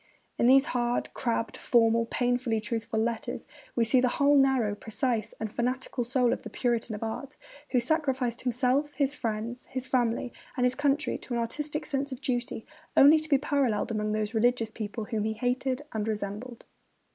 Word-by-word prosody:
In 235 - +4
these 270 +2 +7
hard, 240 -1 0
crabbed, 230 -2 -1
formal, 230 -1 +3
painfully 245 -2 0
truthful 220 0 -2
letters 230 0 -2 0.3
we 235 - +3
see 250 +3 +4
the 255 - +3
whole 285 +1 +5
narrow, 265 -6 +3
precise, 220 0 -2
and 220 -2 -3
fanatical 250 +1 -1
soul 245 0 +2
of - - -4
this - - -8
Puritan 235 -3 -1
of 210 - -6
art, 260 +5 -5 0.3
who 250 - +3
sacrificed 260 -3 0
himself, 255 +4 +1
his 280 -1 +1
family, 225 -3 -2 0.2
his 260 -1 -3
friends, 245 -1 0 0.3
and 250 - +3
his 250 - +3
country 285 +1 0
to 245 - -5
an - - 0
artistic 295 +6 -3
sense 280 -1 -2
of 260 - -5
duty 245 -4 -2 0.3
only 295 +3 +8
to 310 0 -7
be 280 - +5
paralleled 270 -6 0
among 215 -1 -1
those 215 +1 -1
religious 230 0 +2
people 215 0 -5
whom 215 -2 -2
he 220 0 0
hated 255 +4 -1
and 220 -1 -2
resembled. 215 +3 -4
245 Hz, 180 wpm, -28 LUFS, 225-265 Hz, 0.3 s, only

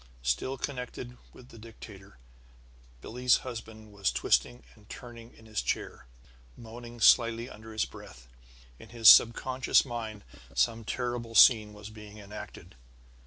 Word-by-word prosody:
Still 65 - -2
connected 125 -2 -6 0.2
with 125 0 -17
the 115 - -14
dictator, 105 - -14 0.8
Billie's 125 - +1
husband 110 -3 -9
was 100 -1 -1
twisting 120 0 0
and 105 -2 -23
turning 120 -1 -11
in 110 - -19
his 110 -1 -3
chair, - - -4 0.5
moaning 120 +1 -11
slightly 115 0 +4
under 110 -1 -12
his 110 -1 -1
breath. 60 -1 -14 0.5
In - - -14
his 115 -1 +1
subconscious 130 +5 +5
mind 110 -4 -7 0.3
some 115 -1 0
terrible 120 -1 -4
scene 110 -4 +6
was 105 0 -11
being 105 -1 -13
enacted. 105 0 -11
115 Hz, 130 wpm, -28 LUFS, 105-120 Hz, 0.8 s, scene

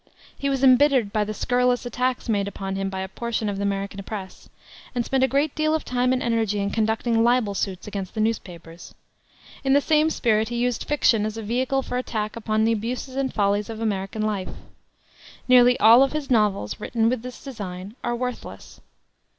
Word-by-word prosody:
He 280 - -2
was 270 -1 -1
embittered 260 -4 +4
by 215 - +2
the 210 - -4
scurrilous 245 +3 +1
attacks 250 +1 -2
made 200 -3 0
upon 195 -1 -5
him 195 0 -2
by 190 0 -4
a 190 - -4
portion 225 +2 -3
of 200 - -3
the - - -4
American 200 0 -2
press, 195 -2 -8 0.5
and 240 -1 0
spent 265 -1 +1
a - - +5
great 280 +3 0
deal 310 0 +1
of 315 - -3
time 250 0 +1
and 255 0 0
energy 225 -3 0
in 200 0 -1
conducting 225 +1 +1
libel 240 -3 +2
suits 190 -2 -3
against 200 -3 -6
the - - -3
newspapers. 175 -6 -4 0.7
In 270 0 +2
the 285 - +6
same 310 +1 +2
spirit 220 -6 +1
he 240 - -4
used 245 0 -1
fiction 240 -7 +2
as 215 +1 -3
a 225 - -5
vehicle 255 +5 0
for 250 - -3
attack 215 -4 -3
upon 220 -1 0
the 225 - +3
abuses 245 +4 -4
and 270 -1 -1
follies 205 +1 0
of 220 -1 -6
American 210 -1 -2
life. 205 -3 -2 1.0
Nearly 250 -1 +6
all 230 +4 +8
of 275 +1 +2
his 300 -3 -4
novels, 210 - +1
written 225 -1 0
with 245 -1 0
this 250 0 -9
design, 200 -6 -7
are 240 - -1
worthless. 250 0 -6
225 Hz, 200 wpm, -24 LUFS, 205-250 Hz, 1.0 s, all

